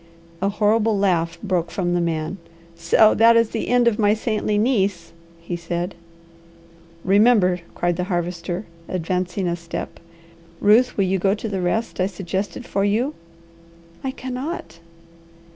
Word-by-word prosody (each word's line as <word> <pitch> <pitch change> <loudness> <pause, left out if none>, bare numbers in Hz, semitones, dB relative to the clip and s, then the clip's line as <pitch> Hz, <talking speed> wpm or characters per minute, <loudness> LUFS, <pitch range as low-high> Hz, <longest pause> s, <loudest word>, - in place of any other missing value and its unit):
A 195 - +2
horrible 215 +1 +2
laugh 175 -4 +1
broke 180 -4 0
from 175 0 -1
the 175 - +1
man. 165 +1 -2 0.4
"So 170 +6 +4
that 230 +1 +6
is 230 -1 +2
the 225 - -3
end 245 -1 +3
of 230 -2 +2
my 210 0 +4
saintly 215 -2 -1
niece!" 200 -7 0 0.3
he 170 +1 -5
said. 175 +2 -3 1.1
"Remember!" 195 -2 +4 0.2
cried 175 -1 0
the 180 - -1
Harvester 175 +1 -3 0.2
advancing 180 +1 -2
a 170 - 0
step. 170 0 -7 0.6
"Ruth, 220 +5 +4
will 195 - +3
you 190 +1 0
go 195 +2 +2
to 220 - -5
the 195 -3 -2
rest 205 +6 -1
I 185 - +2
suggested 195 +4 -4
for 195 - -1
you?" 225 +8 +1 0.9
"I 265 - -1
cannot." 260 - -6
195 Hz, 145 wpm, -22 LUFS, 175-220 Hz, 1.1 s, that